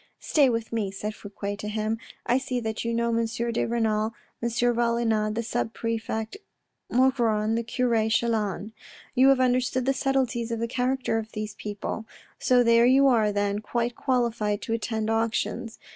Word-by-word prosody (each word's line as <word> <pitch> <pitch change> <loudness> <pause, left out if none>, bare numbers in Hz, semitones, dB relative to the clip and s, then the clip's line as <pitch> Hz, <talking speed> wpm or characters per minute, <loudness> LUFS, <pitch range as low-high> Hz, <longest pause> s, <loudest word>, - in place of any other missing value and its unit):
" - - -52
Stay 285 -4 +6
with 230 -1 -2
me," 215 -4 0
said 210 +2 -4
Fouque 205 -1 -6
to 210 - -5
him. 215 +1 -1
" - - -35
I - - +3
see 260 -2 -2
that 220 -1 -3
you 230 - -1
know 235 0 +1
M. 230 - +2
de 235 +1 -1
Renal, 220 -1 0 0.3
M. 235 - 0
Valenod, 235 -2 +1
the 230 - -1
sub 230 0 -2
prefect 225 - -3 0.5
Maugron, 235 -4 +2
the 230 - +1
cure 230 -2 +1
Chelan. 220 -3 0 0.4
You 260 +1 +5
have 270 -1 +5
understood 255 0 +1
the 270 - +3
subtleties 255 -3 0
of 230 - -2
the 230 - -1
character 250 -1 0
of 220 0 -7
those 215 -1 -4
people. 210 +1 -5 0.3
So 250 -1 +4
there 235 0 +5
you 270 +2 +5
are 220 -4 +3
then, 205 0 0
quite 235 +2 -2
qualified 230 -5 0
to 225 - -2
attend 220 -1 -1
auctions. 225 +1 -1
230 Hz, 175 wpm, -26 LUFS, 220-245 Hz, 0.5 s, Stay